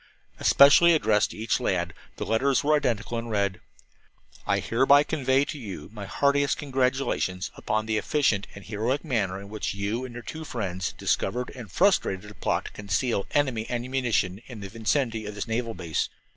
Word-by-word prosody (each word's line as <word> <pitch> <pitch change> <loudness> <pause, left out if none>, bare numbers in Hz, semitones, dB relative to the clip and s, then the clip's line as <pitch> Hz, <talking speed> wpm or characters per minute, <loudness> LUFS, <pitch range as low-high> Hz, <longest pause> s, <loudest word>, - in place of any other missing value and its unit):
Especially 145 +5 +7
addressed 105 -8 +2
to - - -10
each 110 +2 0
lad, 90 -8 -1 0.2
the - - -4
letters 130 +6 +2
were 150 +1 +4
identical 120 -5 -1
and 115 0 -6
read: 100 -3 -1 0.9
"I - - +3
hereby 135 +5 +4
convey 140 -3 +1
to 150 - -6
you 100 - -8
my 105 -3 -7
heartiest 140 +3 +2
congratulations 130 -9 -1
upon 110 0 -1
the 110 -1 0
efficient 125 -10 +1
and 100 - -11
heroic 115 +8 -1
manner 100 -9 -1
in 100 - -10
which 105 -2 -3
you 105 +5 -2
and 125 -2 -8
your 120 - -7
two 160 +6 -7
friends 95 - -3
discovered 125 +1 -1
and 115 -7 -10
frustrated 105 - +2
a - - -11
plot 85 - -1
to - - -7
conceal 100 +2 -1
enemy 130 -6 0
ammunition 120 -6 -1
in 120 -5 -9
the 100 - -6
vicinity 115 0 -1
of 105 - -6
this 105 - -4
naval 115 0 -2
base. 85 -4 -2
115 Hz, 175 wpm, -26 LUFS, 100-135 Hz, 0.9 s, Especially